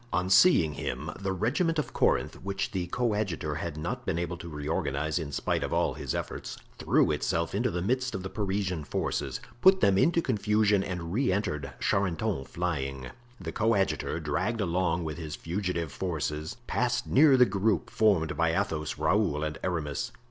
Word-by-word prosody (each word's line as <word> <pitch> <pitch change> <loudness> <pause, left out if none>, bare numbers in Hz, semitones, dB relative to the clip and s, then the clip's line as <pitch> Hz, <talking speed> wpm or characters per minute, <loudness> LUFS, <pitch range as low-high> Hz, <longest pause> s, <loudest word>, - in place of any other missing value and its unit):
On 90 +1 0
seeing 90 - +6
him, - - -4
the 95 -1 -2
regiment 145 - 0
of 150 - -2
Corinth, - - +1
which 100 +1 -3
the 90 -3 -2
coadjutor 105 -8 -1
had 80 -2 -4
not 75 - -3
been 80 - -1
able 85 +1 -2
to 85 0 -8
reorganize 75 +1 -1
in 75 -3 -5
spite 70 - -1
of - - -3
all - - +2
his - - -4
efforts, - - -5 0.2
threw - - +3
itself 85 0 -1
into 120 +6 +1
the 90 -4 -2
midst 130 +4 0
of 95 - -4
the 95 - -4
Parisian 95 -5 -1
forces, - - -2 0.2
put 190 0 +7
them 100 - +4
into 170 +5 +4
confusion 105 -5 +2
and 90 -3 -4
re 125 -1 +2
entered 75 -8 -2
Charenton 95 -4 0
flying. 70 -7 -3 0.3
The 85 -4 -5
coadjutor, 100 -5 +1
dragged 85 +9 -1
along 90 -2 0
with 80 +1 -5
his 75 -3 -5
fugitive 85 -3 -3
forces, 75 -3 -3
passed - - 0
near 140 -1 +6
the 125 - +7
group 100 - 0
formed 95 -8 +2
by 85 0 +2
Athos, 75 -2 -2
Raoul 80 -1 +1
and 75 0 -3
Aramis. 85 - -2
90 Hz, 170 wpm, -28 LUFS, 80-105 Hz, 0.3 s, put